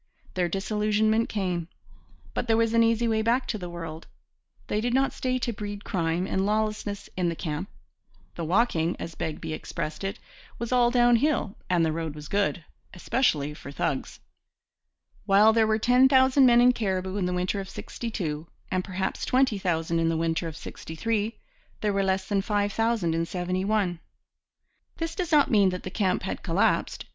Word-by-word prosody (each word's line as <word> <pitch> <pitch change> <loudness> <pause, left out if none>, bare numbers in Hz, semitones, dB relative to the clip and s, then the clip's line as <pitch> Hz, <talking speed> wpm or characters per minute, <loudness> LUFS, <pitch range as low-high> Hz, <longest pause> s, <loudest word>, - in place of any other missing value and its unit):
Their 180 -2 0
disillusionment 215 +3 +1
came; 180 -5 -2 0.7
but 245 - -2
there 225 -1 +3
was 230 0 +2
an 230 - +5
easy 230 +1 +3
way 220 -1 +1
back 240 +4 +1
to 215 - -2
the 180 -2 -6
world. 165 -2 -7 0.6
They 210 - -1
did 240 +2 0
not 270 +1 +2
stay 255 0 -1
to 240 -1 -2
breed 205 0 -6
crime 170 0 0
and 190 0 0
lawlessness 210 -1 -1
in 180 -2 +1
the 165 - -3
camp. 160 +4 -4 0.6
'The 170 - -5
walking' 175 -2 +1
as 165 - -6
Begbie 160 0 -4
expressed 155 +2 -5
it 195 0 -3 0.4
'was 235 +1 -4
all 245 -1 +4
down 240 -1 +4
hill 265 -6 0
and 175 -2 +3
the 160 - +1
road 160 -1 -4
was 150 0 -9
good, 200 -4 0 0.3
especially 155 - 0
for 140 -2 -10
thugs.' 140 -1 -3 1.1
While 210 +2 +6
there 225 -1 +3
were 215 0 +2
ten 250 +4 +5
thousand 260 0 +5
men 240 0 +6
in 250 +1 +7
Cariboo 190 -4 -2
in 185 -3 0
the - - -1
winter 180 +3 -1
of 190 -1 -6
'62 170 -10 -5 0.2
and 185 0 0
perhaps 190 0 -3
twenty 255 -5 +2
thousand 165 -2 0
in 165 0 +2
the 165 - 0
winter 165 +1 -1
of 160 -1 -7
'63, 215 +6 -3 0.4
there 210 -1 +1
were 195 - +1
less 190 0 0
than 200 -2 +1
five 205 0 0
thousand 225 -7 +1
in 165 0 -1
'71. 185 +1 -1 1.0
This 330 0 -3
does 355 -3 -3
not 295 -2 +4
mean 200 -4 +5
that 180 0 -5
the 185 - -6
camp 185 -3 0
had 190 - -4
collapsed. 180 +2 0
200 Hz, 180 wpm, -26 LUFS, 175-230 Hz, 1.1 s, in